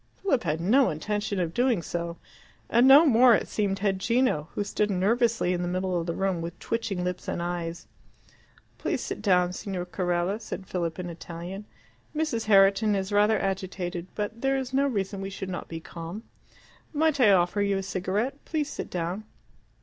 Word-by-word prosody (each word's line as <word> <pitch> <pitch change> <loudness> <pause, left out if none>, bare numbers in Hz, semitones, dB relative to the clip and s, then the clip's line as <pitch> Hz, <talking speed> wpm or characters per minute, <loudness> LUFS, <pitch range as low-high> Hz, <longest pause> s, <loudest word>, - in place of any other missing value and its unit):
Philip 275 - +1
had 155 -1 0
no 245 +10 +4
intention 205 +5 -2
of 170 -2 -1
doing 240 -6 +2
so; 170 0 -4 0.5
and 240 +3 +5
no 285 +5 +9
more, 245 -3 +6
it - - -2
seemed, 200 -2 -1
had 195 -1 0
Gino, 230 - +1
who 205 - 0
stood 210 +1 -1
nervously 215 +1 +2
in 175 - -1
the 175 - -1
middle 185 +1 -1
of 170 - -4
the 170 - -2
room 190 -3 0
with 170 +1 -6
twitching 220 -6 -2
lips 180 0 -4
and - - -2
eyes. 170 -1 -4 0.9
"Please - - -1
sit - - -5
down, 180 -3 +3
Signor 185 -1 -4
Carella," 180 +2 -1
said 195 - -6
Philip 170 -3 -3
in 180 -1 -4
Italian. 175 +4 -7 0.5
"Mrs. 300 -8 -1
Herriton 200 +1 +5
is 190 +1 -2
rather 210 +1 +4
agitated, 185 -2 -3
but 215 +2 -4
there 270 0 +2
is 260 -1 -4
no 275 +1 +3
reason 200 -5 -2
we 195 - -4
should 190 -1 -6
not 180 - -5
be 165 - -6
calm. 170 +6 -8 0.7
Might 310 -1 +2
I 240 -5 +6
offer 185 +2 +3
you 200 -1 +1
a 195 - -3
cigarette? 200 +8 -2
Please 305 -2 -2
sit - - -5
down." 180 +4 -3
195 Hz, 185 wpm, -27 LUFS, 180-225 Hz, 0.9 s, no